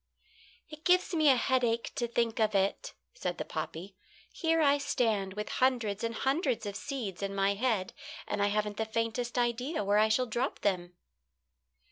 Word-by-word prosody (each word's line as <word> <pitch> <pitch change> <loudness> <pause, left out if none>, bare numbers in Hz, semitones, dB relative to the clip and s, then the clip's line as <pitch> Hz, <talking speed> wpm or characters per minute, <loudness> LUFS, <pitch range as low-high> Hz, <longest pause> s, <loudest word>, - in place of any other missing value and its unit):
"It 305 0 -12
gives 365 0 +3
me 310 -3 +4
a 265 - +7
headache 240 -2 +1
to 245 -4 -1
think 235 0 0
of 215 -2 +2
it," 195 0 0 0.2
said - - -3
the - - -4
poppy. 185 +4 -6 0.4
"Here 325 -1 +1
I 285 -2 +4
stand 210 -8 0
with 210 0 -4
hundreds 235 -6 +1
and 230 0 -2
hundreds 265 - 0
of 200 -1 -4
seeds 235 -8 -5
in 195 0 -3
my 195 0 +2
head, 210 -3 0 0.3
and 200 - -2
I 200 - +3
haven't 210 0 -1
the 220 - 0
faintest 230 +2 -2
idea 245 +3 0
where 205 +1 +3
I 215 +1 +4
shall 250 +4 +2
drop 240 +3 -2
them." 180 -3 -1
230 Hz, 175 wpm, -31 LUFS, 205-260 Hz, 0.4 s, a